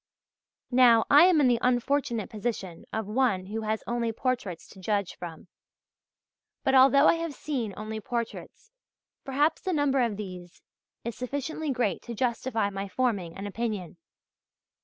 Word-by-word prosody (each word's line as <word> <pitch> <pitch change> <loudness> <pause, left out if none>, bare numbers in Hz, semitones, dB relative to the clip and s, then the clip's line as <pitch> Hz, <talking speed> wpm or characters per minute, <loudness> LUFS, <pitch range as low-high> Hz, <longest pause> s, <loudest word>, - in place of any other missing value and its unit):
Now, 245 -2 +6
I 295 +4 +9
am 360 -4 +5
in 280 - +5
the 240 -2 +3
unfortunate 245 -2 +1
position 205 -6 -4
of 220 -1 -2
one 210 -4 +1
who 215 +3 -4
has 215 0 -2
only 235 -1 -1
portraits 225 -7 -3
to 195 - -14
judge 200 0 -1
from. 170 0 -9 1.2
But 265 - +2
although 270 +2 +7
I - - +7
have 330 -3 -4
seen 250 -8 -3
only 215 +1 -5
portraits, 240 - -5 0.5
perhaps 285 +4 +1
the 375 - -2
number 285 -3 +2
of 230 -4 0
these 180 -4 -9 0.4
is 235 0 -4
sufficiently 285 +4 -4
great 240 -8 0
to 235 - -7
justify 230 -2 -1
my 195 0 -4
forming 195 -6 -1
an 200 - -6
opinion. 205 -4 -4
235 Hz, 150 wpm, -28 LUFS, 205-265 Hz, 1.2 s, I